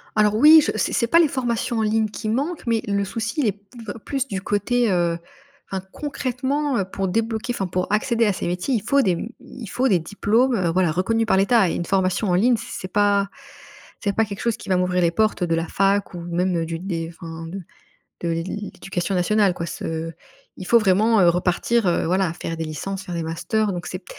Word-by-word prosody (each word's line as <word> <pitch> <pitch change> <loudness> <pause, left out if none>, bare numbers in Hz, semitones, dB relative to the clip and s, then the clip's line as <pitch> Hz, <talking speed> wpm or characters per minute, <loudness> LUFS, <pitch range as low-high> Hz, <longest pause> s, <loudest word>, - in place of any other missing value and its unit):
Alors 210 0 +3
oui, 310 +6 +8
je - - 0
c'est - - 0
c'est 235 - +1
pas 335 - +5
les 335 - +5
formations 240 -3 -1
en - - +2
ligne 220 0 +1
qui 215 +1 -5
manquent, 285 +9 -2
mais 230 -2 +1
le 200 0 +1
souci, 225 +7 -3
il 250 - +2
est - - +3
p 200 - -18 0.5
plus 275 -1 -2
du 195 -6 -4
côté, 220 +4 +1
heu 170 -2 +1 0.5
enfin 190 -1 -4
concrètement, 275 0 -2
heu, 195 - 0
pour 195 0 -2
débloquer, 225 +3 -1
enfin 195 -5 -2
pour 180 +2 -2
accéder 230 +2 +2
à 210 - +3
ces 180 - -4
métiers, 180 +9 -1
il 225 - +1
faut 280 +6 +2
des 180 -6 +1 0.2
il 240 -5 -10
faut 255 +6 0
des 190 -7 +3
diplômes, 215 +8 +1
heu, 180 -5 +1
voilà 180 -1 +2
reconnus 225 +7 +1
par 195 - +2
l'État 195 -1 +4
et - - -2
une 170 - -3
formation 190 +2 +1
en 175 - +3
ligne 240 +6 +4
c'est 185 - -6
pas 200 0 +2 0.7
c'est 200 -2 0
pas 225 - +3
quelque 200 -2 -7
chose 235 -2 0
qui - - -10
va 185 - +3
m'ouvrir 180 0 +1
les 170 -1 +3
portes 215 -1 +1
de 165 -1 +1
la 165 0 -2
fac 195 0 +1
ou 175 - -6
même, 175 +2 -1
heu, 165 - -1
du 165 0 -4
dé 165 -3 -4
enfin 165 -1 -7
de 190 +4 -6 0.6
de 170 - -1
l'éducation 185 +2 -3
nationale 195 +2 +3
quoi, 170 - -4
ce 165 +1 -4 0.4
il 185 - -8
faut 235 - +6
vraiment, 215 +2 +3
heu, 175 - +6
repartir, 180 +6 +1
heu, 170 - +1
voilà, 185 -1 +1
faire 165 -1 -5
des 165 - -4
licences, 190 +5 -5
faire 175 - -6
des 165 -1 -2
masters 200 +6 -1
donc 175 0 -5
c'est 185 0 -6
200 Hz, 225 wpm, -22 LUFS, 180-225 Hz, 0.7 s, oui